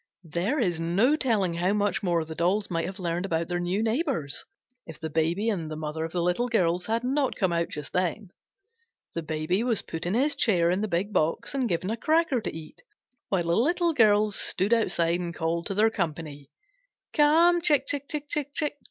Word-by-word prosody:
There 175 Hz, -, -1 dB
is 175 Hz, -8 st, 0 dB
no 195 Hz, -, +2 dB
telling 220 Hz, -, +1 dB
how 180 Hz, +4 st, 0 dB
much 205 Hz, -1 st, 0 dB
more 170 Hz, -4 st, 0 dB
the 160 Hz, -, -7 dB
dolls 185 Hz, +5 st, 0 dB
might 165 Hz, -1 st, -1 dB
have 190 Hz, +1 st, -7 dB
learned 175 Hz, -1 st, -2 dB
about 165 Hz, -3 st, -1 dB
their 175 Hz, 0 st, -1 dB
new 180 Hz, +5 st, -1 dB
neighbors, 230 Hz, -, 0 dB, 0.4 s
if 160 Hz, -2 st, -10 dB
the 160 Hz, -1 st, -5 dB
Baby 165 Hz, +7 st, 0 dB
and 175 Hz, -8 st, -1 dB
the 155 Hz, -, -5 dB
mother 155 Hz, +1 st, -4 dB
of 165 Hz, -, -4 dB
the 175 Hz, 0 st, -1 dB
Little 180 Hz, +8 st, +1 dB
Girls 180 Hz, -6 st, +1 dB
had 225 Hz, +2 st, 0 dB
not 270 Hz, +1 st, 0 dB
come 185 Hz, -3 st, 0 dB
out 170 Hz, 0 st, 0 dB
just 150 Hz, -1 st, -7 dB
then. 185 Hz, +2 st, -1 dB, 0.8 s
The 170 Hz, -, -3 dB
Baby 155 Hz, +5 st, -1 dB
was 235 Hz, -4 st, 0 dB
put 165 Hz, +1 st, -5 dB
in 185 Hz, -, 0 dB
his 285 Hz, +5 st, +2 dB
chair 175 Hz, -7 st, +2 dB
in 185 Hz, +3 st, 0 dB
the 215 Hz, -, -1 dB
big 195 Hz, +3 st, -2 dB
box 180 Hz, -, 0 dB
and 260 Hz, -4 st, 0 dB
given 180 Hz, +3 st, -1 dB
a 225 Hz, -, -2 dB
cracker 310 Hz, -2 st, +2 dB
to -, -, -3 dB
eat, 160 Hz, -1 st, -10 dB, 0.5 s
while 185 Hz, -3 st, +1 dB
the 170 Hz, 0 st, +1 dB
Little 340 Hz, -, +2 dB
Girls 210 Hz, -4 st, +4 dB
stood 200 Hz, +5 st, +1 dB
outside 175 Hz, -7 st, +1 dB
and 170 Hz, -2 st, -5 dB
called 165 Hz, 0 st, -1 dB
to 195 Hz, -, -3 dB
their 220 Hz, +2 st, +4 dB
company. 155 Hz, -7 st, -4 dB, 0.6 s
"Come, 335 Hz, +3 st, +5 dB
Chick, 295 Hz, -5 st, +3 dB
Chick, 280 Hz, 0 st, -3 dB, 0.2 s
Chick!" 295 Hz, +1 st, -2 dB
185 Hz, 205 wpm, -27 LUFS, 170-235 Hz, 0.8 s, Come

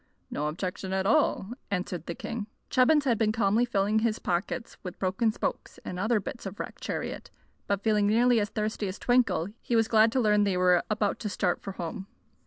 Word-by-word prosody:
"No 150 Hz, -, -1 dB
objection 185 Hz, +4 st, -4 dB
at 190 Hz, 0 st, 0 dB
all," 230 Hz, -5 st, +2 dB, 0.2 s
answered 180 Hz, -4 st, -3 dB
the 170 Hz, -, -4 dB
king. 225 Hz, -2 st, -5 dB, 0.2 s
Chubbins 280 Hz, +3 st, +4 dB
had 235 Hz, -5 st, +2 dB
been 215 Hz, -2 st, +3 dB
calmly 220 Hz, +2 st, +2 dB
filling 210 Hz, -2 st, +1 dB
his 220 Hz, 0 st, 0 dB
pockets 195 Hz, +7 st, -3 dB
with 180 Hz, -2 st, -7 dB
broken 195 Hz, +4 st, +1 dB
spokes -, -, -4 dB
and 180 Hz, -, -5 dB
other 220 Hz, +3 st, +2 dB
bits 205 Hz, +2 st, -6 dB
of 195 Hz, -, -7 dB
the -, -, -3 dB
wrecked -, -, -11 dB
chariot; -, -, -4 dB, 0.4 s
but 200 Hz, 0 st, -1 dB
feeling 210 Hz, -2 st, +3 dB
nearly 235 Hz, +2 st, +4 dB
as 205 Hz, -1 st, -1 dB
thirsty 215 Hz, 0 st, -2 dB
as 185 Hz, -, -5 dB
Twinkle, 245 Hz, -8 st, +2 dB
he 240 Hz, -, -1 dB
was 225 Hz, -1 st, +3 dB
glad 220 Hz, 0 st, +5 dB
to 265 Hz, -, +2 dB
learn 210 Hz, -3 st, +4 dB
they 195 Hz, -3 st, +1 dB
were 180 Hz, -1 st, +4 dB
about 210 Hz, -2 st, 0 dB
to 215 Hz, -, -3 dB
start 185 Hz, -2 st, 0 dB
for 195 Hz, -, -6 dB
home. 185 Hz, +2 st, -6 dB
210 Hz, 205 wpm, -28 LUFS, 190-230 Hz, 0.4 s, glad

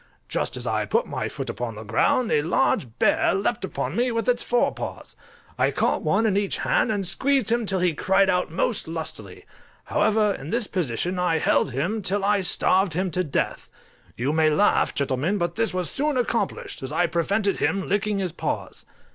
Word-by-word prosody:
Just -, -, -1 dB
as -, -, -4 dB
I -, -, 0 dB
put 475 Hz, -, +1 dB
my -, -, -4 dB
foot -, -, -6 dB
upon -, -, -4 dB
the -, -, -8 dB
ground 250 Hz, -3 st, +1 dB
a 150 Hz, -, +3 dB
large 155 Hz, -4 st, +1 dB
bear -, -, +2 dB
leaped 200 Hz, +3 st, -1 dB
upon 190 Hz, -, -3 dB
me 245 Hz, +1 st, +1 dB
with 230 Hz, +1 st, -2 dB
its 245 Hz, -1 st, +2 dB
fore 245 Hz, 0 st, +1 dB
paws; -, -, -7 dB, 0.4 s
I -, -, +3 dB
caught -, -, 0 dB
one 225 Hz, -, +1 dB
in 210 Hz, -3 st, +2 dB
each 200 Hz, -1 st, 0 dB
hand, 225 Hz, -, +1 dB
and 205 Hz, -3 st, -1 dB
squeezed 265 Hz, +5 st, +2 dB
him 235 Hz, -2 st, +1 dB
till 195 Hz, -, +1 dB
he 180 Hz, -2 st, +2 dB
cried 190 Hz, +5 st, +2 dB
out 180 Hz, -1 st, +1 dB
most 190 Hz, +6 st, -1 dB
lustily; 155 Hz, -, -5 dB, 0.4 s
however, 210 Hz, 0 st, +2 dB
in 140 Hz, +2 st, -8 dB
this 235 Hz, +3 st, 0 dB
position 180 Hz, -, -2 dB
I 175 Hz, -2 st, +1 dB
held 155 Hz, -, +2 dB
him 170 Hz, -, -2 dB
till 195 Hz, +1 st, -1 dB
I 205 Hz, -1 st, +2 dB
starved 185 Hz, 0 st, +3 dB
him 185 Hz, +2 st, -1 dB
to 185 Hz, +3 st, 0 dB
death. 145 Hz, -6 st, -2 dB, 0.5 s
You 135 Hz, +5 st, -1 dB
may 160 Hz, -1 st, +3 dB
laugh, 200 Hz, +7 st, +2 dB
gentlemen, 140 Hz, +8 st, 0 dB
but 175 Hz, -2 st, -1 dB
this 225 Hz, +2 st, -1 dB
was 180 Hz, -2 st, -2 dB
soon 290 Hz, 0 st, 0 dB
accomplished, 240 Hz, -1 st, -2 dB
as 130 Hz, +1 st, -5 dB
I 175 Hz, +3 st, +2 dB
prevented 195 Hz, +5 st, 0 dB
him 195 Hz, -1 st, 0 dB
licking 205 Hz, +1 st, 0 dB
his 185 Hz, -3 st, -2 dB
paws. -, -, -5 dB
190 Hz, 195 wpm, -24 LUFS, 165-215 Hz, 0.5 s, a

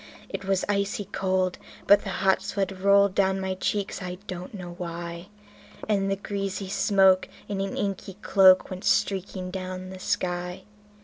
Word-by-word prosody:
It 195 Hz, -, -5 dB
was 195 Hz, -1 st, +1 dB
icy 200 Hz, 0 st, -1 dB
cold, 185 Hz, -1 st, -1 dB, 0.3 s
but 205 Hz, 0 st, +6 dB
the 195 Hz, -, -5 dB
hot 190 Hz, 0 st, +2 dB
sweat 195 Hz, -1 st, -3 dB
rolled 200 Hz, 0 st, +5 dB
down 190 Hz, 0 st, +2 dB
my 190 Hz, 0 st, -2 dB
cheeks, 195 Hz, +1 st, -2 dB
and 180 Hz, -, -4 dB
I 180 Hz, 0 st, -5 dB
don't 180 Hz, -2 st, -6 dB
know 175 Hz, -3 st, -7 dB
why; 170 Hz, 0 st, -6 dB, 0.6 s
And 195 Hz, -2 st, +1 dB
the 195 Hz, -, +1 dB
greasy 195 Hz, -1 st, -4 dB
smoke 190 Hz, -1 st, +4 dB, 0.2 s
in 200 Hz, -1 st, -2 dB
an 195 Hz, 0 st, -3 dB
inky 195 Hz, -1 st, -3 dB
cloak 190 Hz, -1 st, +6 dB
went 185 Hz, 0 st, -6 dB
streaking 185 Hz, -1 st, 0 dB
down 185 Hz, 0 st, -5 dB
the 190 Hz, -, -9 dB
sky. 180 Hz, 0 st, -2 dB
190 Hz, 165 wpm, -26 LUFS, 185-195 Hz, 0.6 s, but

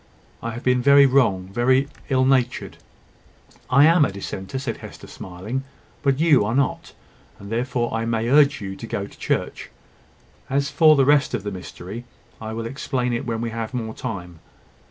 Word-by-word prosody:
I 115 Hz, -, -3 dB
have 120 Hz, -, -7 dB
been 125 Hz, -1 st, +2 dB
very 140 Hz, +2 st, +7 dB
wrong 115 Hz, -9 st, +2 dB
very 130 Hz, +4 st, +3 dB, 0.2 s
ill 130 Hz, -1 st, +3 dB
natured." 130 Hz, -2 st, 0 dB, 0.9 s
"I 140 Hz, +4 st, +6 dB
am 165 Hz, 0 st, +5 dB
a 135 Hz, -, +1 dB
dissenter," 95 Hz, +3 st, -6 dB
said 130 Hz, -4 st, -4 dB
Hester, -, -, -11 dB
smiling, 95 Hz, +9 st, -6 dB, 0.4 s
"but 140 Hz, -1 st, +1 dB
you 155 Hz, -8 st, +5 dB
are 110 Hz, +4 st, -1 dB
not; 140 Hz, -1 st, -1 dB, 0.4 s
and 100 Hz, +1 st, -11 dB
therefore 120 Hz, 0 st, -1 dB
I 115 Hz, 0 st, -1 dB
may 115 Hz, 0 st, -1 dB
urge 140 Hz, +1 st, +4 dB
you 95 Hz, -1 st, -5 dB
to -, -, -8 dB
go -, -, -3 dB
to -, -, -15 dB
church. -, -, -2 dB, 0.8 s
As 140 Hz, +1 st, 0 dB
for 155 Hz, -2 st, +6 dB
the 135 Hz, -2 st, +4 dB
rest 145 Hz, -2 st, +3 dB
of 105 Hz, -, -4 dB
the 105 Hz, -, -4 dB
mystery, 95 Hz, +4 st, -8 dB, 0.4 s
I 110 Hz, 0 st, -5 dB
will 115 Hz, +1 st, -4 dB
explain 125 Hz, 0 st, -2 dB
it 120 Hz, -, -3 dB
when 115 Hz, -1 st, -2 dB
we 115 Hz, -1 st, -3 dB
have 115 Hz, +2 st, -5 dB
more 110 Hz, -2 st, -3 dB
time. 90 Hz, -7 st, -6 dB
120 Hz, 180 wpm, -22 LUFS, 110-135 Hz, 0.9 s, very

